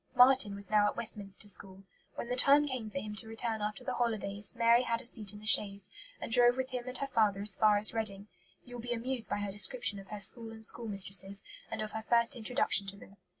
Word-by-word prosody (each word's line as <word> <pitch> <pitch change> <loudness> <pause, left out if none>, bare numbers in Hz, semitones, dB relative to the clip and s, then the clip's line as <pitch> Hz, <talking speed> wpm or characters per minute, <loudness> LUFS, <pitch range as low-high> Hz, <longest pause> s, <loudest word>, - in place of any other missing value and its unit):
Marten 250 -5 +4
was 200 0 -9
now 210 -1 +3
at - - -4
Westminster 205 -3 -3
School. 195 -1 -2 0.3
When - - -6
the 245 - -3
time 285 +3 +5
came 255 -5 -6
for 205 - -8
him 210 +2 -6
to 220 - -5
return 225 0 -3
after 210 +4 -5
the - - -4
holidays, 210 -3 -2
Mary 235 0 +3
had 230 -2 -2
a 255 - -5
seat 215 -4 +1
in 210 - -12
the 210 - -14
chaise, 200 -6 +5 0.3
and - - -8
drove 245 +1 +4
with 260 0 -3
him 250 -1 -6
and 255 0 -7
her 275 - -4
father 210 -3 +1
as 205 -2 +1
far 210 -1 +3
as 210 +1 +1
Reading. 205 -3 -4 0.4
You 245 -1 -10
will - - -8
be 240 +1 -4
amused 240 0 -3
by - - -2
her 205 -1 -4
description 205 +2 0
of 195 - -13
her 210 +1 -8
school 225 +3 +6
and 220 0 -7
schoolmistresses, 200 -3 -1 0.3
and - - -5
of 215 - -7
her 220 - -6
first 235 +1 +2
introduction 235 -3 0
to 195 +1 0
them. 200 0 -17
220 Hz, 240 wpm, -30 LUFS, 200-240 Hz, 0.4 s, school